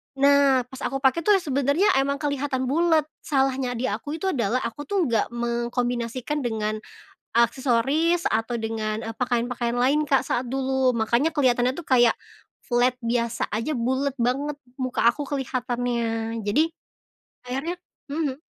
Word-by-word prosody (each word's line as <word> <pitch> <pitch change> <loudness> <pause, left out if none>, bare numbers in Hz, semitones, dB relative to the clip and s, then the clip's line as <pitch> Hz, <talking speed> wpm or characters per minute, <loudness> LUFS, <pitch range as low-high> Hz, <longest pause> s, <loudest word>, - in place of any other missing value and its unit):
Nah, 280 -1 +5
pas 265 - -10
aku 270 +1 -2
pakai 280 +5 +2
tuh, 420 - +6
ya 385 - +3
sebenernya 285 +7 +2
emang 280 +2 0
kelihatan 275 -3 -1
bulet. 325 +1 +3 0.2
Salahnya 265 -3 +1
di 250 +2 -2
aku 230 +9 -4
itu 385 - +1
adalah, 245 - 0
aku 290 +6 -5
tuh 365 -6 0
nggak 230 +1 0
mengkombinasikan 240 +3 -2
dengan 215 -2 -1 0.5
aksesoris 265 +8 +2
atau 225 +2 0
dengan, 220 0 -3
eee, 225 - -5
pakaian-pakaian 245 -1 -1
lain, 280 +5 +3
Kak, 275 -3 +1
saat 245 0 -1
dulu. 265 -1 +1
Makanya 235 +8 +2
kelihatannya 255 -2 +2
tuh 340 - -7
kayak 240 -3 +4 0.5
flat 245 +1 +2
biasa 235 -1 -1
aja 245 +5 -1
bulet 260 +3 0
banget 275 +5 0 0.2
muka 255 -3 -1
aku 290 +5 +3
kelihatannya. 240 -4 -2
Jadi 310 +11 +1 0.7
akhirnya 295 +8 -3 0.3
mhm. 295 -1 -2
255 Hz, 140 wpm, -24 LUFS, 235-285 Hz, 0.7 s, tuh